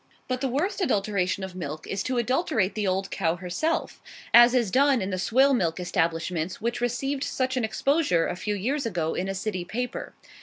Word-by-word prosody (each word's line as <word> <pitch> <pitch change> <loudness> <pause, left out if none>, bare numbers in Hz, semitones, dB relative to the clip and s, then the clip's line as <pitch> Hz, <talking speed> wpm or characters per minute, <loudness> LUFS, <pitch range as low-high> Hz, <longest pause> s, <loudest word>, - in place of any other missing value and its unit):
But 255 0 -2
the 270 - +1
worst 355 +11 -1
adulteration 200 - 0
of 190 -1 -6
milk 155 -3 -6
is 195 - -3
to 255 -1 -1
adulterate 245 - +1
the 210 -2 -1
old 190 +1 -1
cow 165 -3 0
herself; 185 - -2 0.3
as 240 +1 +8
is 235 -6 +2
done 275 +1 +4
in 190 -1 -3
the 185 - -2
swill 265 +8 +4
milk 170 -8 0
establishments 170 -1 -1
which 235 +2 -2
received 270 +3 -1
such 260 -2 -1
an 250 - 0
exposure 245 - +1
a - - -3
few 210 +3 -2
years 260 +6 -1
ago 170 -6 -1
in 185 - -2
a 195 - -2
city 190 -2 -3
paper. 245 +7 -5
215 Hz, 195 wpm, -26 LUFS, 185-260 Hz, 0.3 s, as